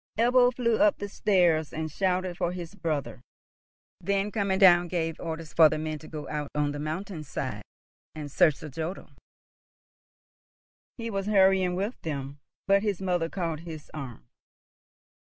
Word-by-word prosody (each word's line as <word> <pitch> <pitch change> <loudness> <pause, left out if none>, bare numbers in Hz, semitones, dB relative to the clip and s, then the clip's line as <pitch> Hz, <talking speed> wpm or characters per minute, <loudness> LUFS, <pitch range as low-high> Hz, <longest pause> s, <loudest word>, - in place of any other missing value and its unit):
Ebbo 245 +2 +5
flew 235 -3 +1
up 305 0 +4
the 205 - -5
stairs, 175 -6 +2
and 155 0 -4
shouted 185 +1 0
for 175 - -1
his 175 0 -7
brother; 155 -9 -3 0.8
then, 200 +3 0
coming 200 -3 0
down, 175 -2 +6
gave 165 -2 -2
orders 160 -1 -6
for 160 -2 +7
the 155 - -2
men 155 0 -4
to 155 - -12
go 150 -2 -7
out 150 -2 -4
on 145 -1 +1
the 145 - -5
mountain 160 +3 -4
side, 140 - -4 0.5
and 150 -2 -6
search 150 0 +3
and 150 -4 -8
jodel. 165 +5 -5 1.9
He 230 -1 -4
was 195 -1 -2
hurrying 190 -3 +4
with 200 +6 -3
them, 140 -2 -5 0.3
but 195 0 +4
his 205 -4 -1
mother 180 -3 0
caught 165 -4 -3
his 160 -3 -9
arm. 125 - -8
175 Hz, 155 wpm, -27 LUFS, 155-195 Hz, 1.9 s, for